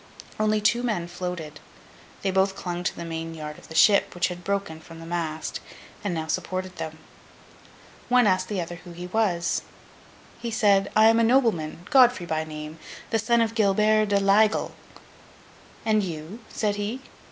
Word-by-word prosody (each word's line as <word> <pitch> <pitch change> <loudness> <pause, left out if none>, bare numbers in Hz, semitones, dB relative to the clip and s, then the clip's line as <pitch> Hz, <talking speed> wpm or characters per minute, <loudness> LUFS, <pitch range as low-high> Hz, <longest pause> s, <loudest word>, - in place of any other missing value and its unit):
Only 215 0 +2
two 215 +3 +3
men 215 -9 -1
floated. 175 -4 -6 0.6
They 195 - +1
both 190 +1 +2
clung 175 -2 -4
to - - -1
the 170 - -6
main 165 0 -5
yard 150 -1 -7
of - - -16
the 160 - -10
ship, 200 +2 +5
which 175 0 +1
had 175 0 -7
broken 195 -4 -2
from 165 +1 -12
the 165 - -9
mast, 165 -2 -3 0.4
and 205 - -1
now 160 -2 -2
supported 185 +2 -3
them. 160 -1 -5 1.1
One 250 -1 +5
asked 185 -2 +2
the 205 -3 -2
other 175 0 -5
who 175 0 -12
he 175 +1 -7
was? 180 -3 0 0.8
He 235 0 -4
said, 205 -4 +3
'I 215 - +6
am 225 0 +4
a - - +4
nobleman, 220 - +1
Godfrey 245 -8 +5
by 160 -2 -1
name, 155 0 -8 0.3
the 225 - +2
son 235 +2 +2
of 225 -1 0
Gilbert 215 0 +3
de 200 0 +2
l'Aigle. 205 +2 +3 1.1
And 215 -1 +3
you?' 170 +3 -6
said 205 -2 -1
he. 215 +6 -3
185 Hz, 175 wpm, -25 LUFS, 170-215 Hz, 1.1 s, I